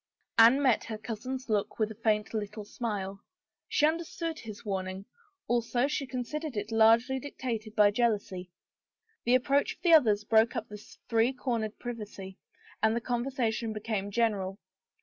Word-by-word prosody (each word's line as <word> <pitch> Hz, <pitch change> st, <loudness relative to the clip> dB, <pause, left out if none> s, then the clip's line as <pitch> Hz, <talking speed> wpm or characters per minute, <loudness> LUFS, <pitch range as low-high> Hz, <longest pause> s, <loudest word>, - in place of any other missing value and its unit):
Anne 235 Hz, +4 st, +8 dB
met 260 Hz, -6 st, +3 dB
her 220 Hz, -1 st, -5 dB
cousin's 255 Hz, +4 st, -5 dB
look 210 Hz, -2 st, -1 dB
with 220 Hz, -1 st, 0 dB
a 220 Hz, +1 st, -12 dB
faint 210 Hz, -1 st, +1 dB
little 210 Hz, -1 st, -4 dB
smile. 200 Hz, -3 st, -4 dB, 0.5 s
She 300 Hz, -, +3 dB
understood 330 Hz, +1 st, -2 dB
his 215 Hz, -1 st, -9 dB
warning; 190 Hz, -1 st, -3 dB, 0.4 s
also 240 Hz, +1 st, +1 dB
she 285 Hz, -2 st, -2 dB
considered 265 Hz, +2 st, -4 dB
it 205 Hz, +2 st, -3 dB
largely 230 Hz, +4 st, +4 dB
dictated 230 Hz, -5 st, -5 dB
by 210 Hz, -1 st, +6 dB
jealousy. 205 Hz, -5 st, -1 dB, 0.8 s
The 245 Hz, +2 st, +5 dB
approach 275 Hz, +3 st, +2 dB
of -, -, -36 dB
the 340 Hz, -2 st, +5 dB
others 215 Hz, -9 st, +5 dB
broke 220 Hz, +1 st, +3 dB
up -, -, -3 dB
this 210 Hz, 0 st, -12 dB
three 230 Hz, +3 st, +2 dB
cor 245 Hz, -2 st, -1 dB
nered 215 Hz, -1 st, -4 dB
privacy 210 Hz, -5 st, -7 dB, 0.4 s
and 220 Hz, 0 st, +3 dB
the -, -, +1 dB
conversation 235 Hz, -2 st, -1 dB
became 210 Hz, -2 st, -3 dB
general. 200 Hz, -3 st, 0 dB
225 Hz, 155 wpm, -30 LUFS, 210-250 Hz, 0.8 s, Anne